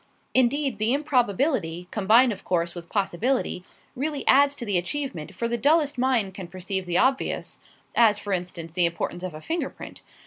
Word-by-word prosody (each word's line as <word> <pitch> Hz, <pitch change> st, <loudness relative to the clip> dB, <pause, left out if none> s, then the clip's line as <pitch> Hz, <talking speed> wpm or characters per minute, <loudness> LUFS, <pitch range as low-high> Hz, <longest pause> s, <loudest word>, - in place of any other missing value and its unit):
Indeed, 260 Hz, -1 st, +2 dB
the 220 Hz, +3 st, +2 dB
improbability 245 Hz, -, 0 dB
combined, 225 Hz, +4 st, +4 dB
of -, -, -12 dB
course, 170 Hz, -1 st, 0 dB
with 170 Hz, -1 st, -9 dB
possibility 205 Hz, +1 st, -1 dB, 0.3 s
really 285 Hz, +2 st, -3 dB
adds 280 Hz, +1 st, +5 dB
to 240 Hz, -, -6 dB
the 200 Hz, -4 st, +2 dB
achievement, 190 Hz, -, -5 dB
for 235 Hz, -, -1 dB
the 235 Hz, 0 st, -2 dB
dullest 295 Hz, +2 st, +3 dB
mind 245 Hz, -7 st, +1 dB
can 190 Hz, -2 st, -7 dB
perceive 185 Hz, +1 st, -4 dB
the 175 Hz, 0 st, +1 dB
obvious 265 Hz, +4 st, 0 dB, 0.3 s
as, 220 Hz, -3 st, +5 dB
for 205 Hz, -1 st, -3 dB
instance, 175 Hz, -2 st, -4 dB
the 175 Hz, 0 st, +2 dB
importance 170 Hz, +1 st, -4 dB
of 180 Hz, -4 st, -5 dB
a 155 Hz, -, -9 dB
finger 330 Hz, -, -2 dB
print. -, -, -11 dB
215 Hz, 175 wpm, -25 LUFS, 180-265 Hz, 0.3 s, adds